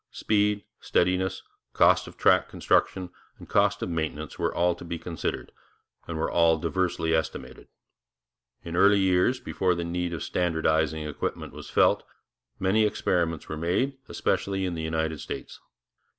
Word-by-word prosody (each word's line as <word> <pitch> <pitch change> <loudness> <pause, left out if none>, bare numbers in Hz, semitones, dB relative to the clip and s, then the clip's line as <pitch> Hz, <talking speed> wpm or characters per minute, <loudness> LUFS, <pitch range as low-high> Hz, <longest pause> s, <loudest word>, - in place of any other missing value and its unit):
Speed, 105 -1 +1 0.2
steadiness, 95 +1 0 0.3
cost - - +4
of - - -12
track - - +4
construction, 90 -2 +1 0.3
and - - -12
cost - - +2
of - - -3
maintenance 80 -2 -4
were - - +1
all 85 0 +2
to 90 - -11
be 85 0 -4
considered, 80 0 -4 0.6
and 85 - -4
were 80 - -1
all 85 -1 +4
diversely 85 -1 -1
estimated. 70 -5 -3 1.0
In 85 0 -5
early 100 +3 +6
years, 95 +6 +2
before 95 -7 0
the 85 - -3
need 90 +1 -2
of 85 -3 -4
standardizing 80 -3 0
equipment 75 - -4
was - - -9
felt, - - +4 0.6
many 95 +4 +2
experiments 85 -6 0
were 80 - -5
made, 125 - 0
especially 95 -1 -1
in 90 - -2
the 80 - -4
United 80 -1 -2
States. - - -7
85 Hz, 150 wpm, -27 LUFS, 80-95 Hz, 1.0 s, early